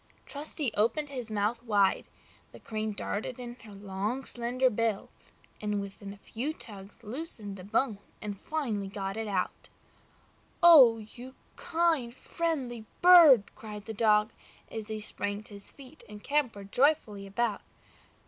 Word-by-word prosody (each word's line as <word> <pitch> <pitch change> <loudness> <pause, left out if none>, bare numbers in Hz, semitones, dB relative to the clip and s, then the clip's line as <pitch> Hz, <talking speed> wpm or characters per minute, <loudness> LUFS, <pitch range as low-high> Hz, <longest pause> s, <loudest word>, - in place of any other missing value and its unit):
Trusty 290 -4 -2
opened 235 +8 +1
his 250 -5 -6
mouth 215 +2 -1
wide; 205 -5 +2 0.5
the - - -12
Crane 215 0 -3
darted 210 +4 -4
in 240 -1 -6
her 215 - -12
long, 200 +6 -4
slender 250 +2 +2
bill, 220 -2 -1 0.5
and 210 -1 -1
with 200 +1 -8
a 200 0 -8
few 245 +9 -4
good - - -24
tugs 205 +1 -11
loosened 220 -4 -5
the 185 - -10
bone 220 +2 0 0.2
and 205 -2 -6
finally 235 -11 -2
got 195 0 -4
it 220 0 -3
out. 190 -3 -3 0.9
"Oh! 275 -10 +9
you 245 +4 -11 0.2
kind, 320 -8 0
friendly 265 -10 -3 0.2
bird!" 330 - +8
cried 210 -2 -9
the 220 - -5
Dog, 210 0 +3 0.4
as 220 -2 -5
he 220 -1 -4
sprang 205 0 -3
to 215 - -10
his 200 -1 -5
feet 275 +2 -15
and 210 0 -11
capered 235 -9 -1
joyfully 245 -8 +1
about. 210 +1 -1
220 Hz, 150 wpm, -29 LUFS, 205-260 Hz, 0.9 s, Oh